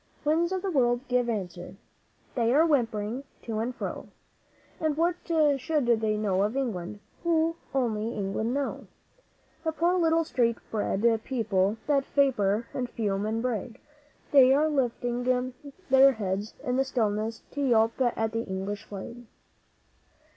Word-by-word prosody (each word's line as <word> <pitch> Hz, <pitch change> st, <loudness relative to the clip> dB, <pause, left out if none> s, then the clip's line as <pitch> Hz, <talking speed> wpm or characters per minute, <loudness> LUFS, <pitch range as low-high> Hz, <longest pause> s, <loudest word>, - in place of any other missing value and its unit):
Winds 330 Hz, +4 st, +2 dB
of 375 Hz, -1 st, -2 dB
the 390 Hz, -, -1 dB
World, 245 Hz, -3 st, +1 dB
give 245 Hz, -1 st, +1 dB
answer! 185 Hz, -5 st, -4 dB, 0.6 s
They 235 Hz, -2 st, +1 dB
are 315 Hz, +3 st, +6 dB
whimpering 235 Hz, -4 st, 0 dB, 0.2 s
to 220 Hz, -2 st, -3 dB
and 240 Hz, +3 st, -2 dB
fro -, -, -5 dB, 0.7 s
And 310 Hz, -2 st, 0 dB
what 340 Hz, +1 st, +2 dB
should 300 Hz, -3 st, +2 dB
they 220 Hz, -2 st, +2 dB
know 195 Hz, -3 st, +1 dB
of 215 Hz, +6 st, 0 dB
England 205 Hz, -6 st, -3 dB, 0.2 s
who 330 Hz, -1 st, +2 dB, 0.2 s
only 230 Hz, -5 st, 0 dB
England 205 Hz, +3 st, -2 dB
know? 280 Hz, +1 st, -3 dB, 0.8 s
The 320 Hz, -, 0 dB
poor 340 Hz, +3 st, +1 dB
little 330 Hz, -1 st, +3 dB
street 235 Hz, -6 st, +1 dB
bred 210 Hz, 0 st, -1 dB, 0.2 s
people 215 Hz, -5 st, 0 dB
that 280 Hz, -2 st, +2 dB
vapour 230 Hz, -6 st, +2 dB
and 250 Hz, -2 st, -3 dB
fume 205 Hz, -3 st, -1 dB
and 225 Hz, +2 st, -1 dB
brag, 235 Hz, -2 st, -3 dB, 0.5 s
They 270 Hz, -2 st, +7 dB
are 300 Hz, +2 st, +3 dB
lifting 245 Hz, -3 st, -1 dB, 0.7 s
their 270 Hz, +1 st, +7 dB
heads 205 Hz, -1 st, -3 dB
in 250 Hz, 0 st, 0 dB
the 270 Hz, -, +3 dB
stillness 220 Hz, -4 st, -1 dB
to 285 Hz, -, -4 dB
yelp 230 Hz, -4 st, +3 dB
at 225 Hz, -3 st, +1 dB
the 225 Hz, 0 st, -1 dB
English 195 Hz, 0 st, -4 dB
Flag! 230 Hz, +4 st, -9 dB
240 Hz, 145 wpm, -27 LUFS, 215-275 Hz, 0.8 s, They